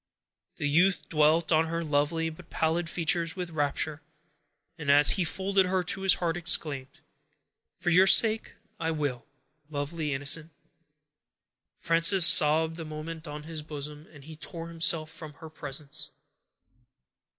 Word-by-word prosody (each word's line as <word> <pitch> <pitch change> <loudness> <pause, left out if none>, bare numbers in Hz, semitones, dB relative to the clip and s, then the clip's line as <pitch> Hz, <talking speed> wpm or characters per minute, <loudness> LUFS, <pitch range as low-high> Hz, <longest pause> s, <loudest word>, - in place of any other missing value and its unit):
The 145 - -3
youth 165 +1 +2
dwelt 155 +2 +2
on 160 0 +2
her 165 +1 -3
lovely 155 +2 -1
but 165 +2 -15
pallid 165 +1 -1
features 170 0 -1
with 180 -2 -6
rapture; 150 0 -3 0.7
and, 150 -4 -6
as 145 +1 +6
he 190 - 0
folded 190 +2 0
her 185 0 0
to 190 +3 -3
his 195 -1 +4
heart, 170 -2 -2
exclaimed,— 155 -6 0 0.8
"For 175 - -2
your 185 +3 +5
sake, 220 +2 +4 0.2
I 160 - -2
will, 145 -6 -4 0.4
lovely 150 0 -4
innocent!" 150 +3 -1 1.2
Frances 170 +2 +3
sobbed 160 +1 +5
a - - -5
moment 155 +1 -8
on 150 0 -8
his 160 0 -7
bosom, 150 0 -9
and 145 -3 -15
he 160 +2 -11
tore 165 +1 -7
himself 165 -1 +2
from 155 -2 -10
her 160 +1 -13
presence. 145 0 -6
160 Hz, 140 wpm, -27 LUFS, 150-170 Hz, 1.2 s, as